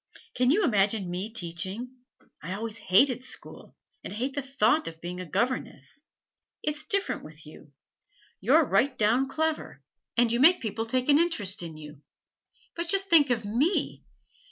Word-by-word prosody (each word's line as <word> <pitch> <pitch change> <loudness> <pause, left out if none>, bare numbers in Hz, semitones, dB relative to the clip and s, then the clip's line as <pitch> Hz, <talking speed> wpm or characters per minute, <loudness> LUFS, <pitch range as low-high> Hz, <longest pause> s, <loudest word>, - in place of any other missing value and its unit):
Can 250 0 +2
you 390 +9 +3
imagine 205 - +1
me 190 +5 -4
teaching? 195 +6 -5 0.4
I 175 +4 -5
always 225 +1 -6
hated 250 +6 +3
school, - - -8 0.3
and - - -6
I - - -7
hate 260 +5 -2
the 285 - -2
thought 270 +2 +1
of 165 -1 -8
being 175 +2 -6
a 185 - -6
governess. 250 - -3 0.6
It's 300 0 -3
different 395 0 -1
with 155 +1 -13
you; 150 -1 -14 0.7
you're - - +4
right 265 -1 +1
down 235 +5 +2
clever, 315 +1 -3 0.3
and 235 -1 +4
you 235 - +1
make 335 +7 +6
people 225 0 -4
take 255 +2 -1
an 290 0 +5
interest 220 - +1
in 165 -2 -7
you. 150 -1 -12 0.7
But 340 0 -3
just 390 +2 +2
think 300 -4 +6
of 230 -3 0
me! 260 - 0
235 Hz, 165 wpm, -27 LUFS, 190-285 Hz, 0.7 s, make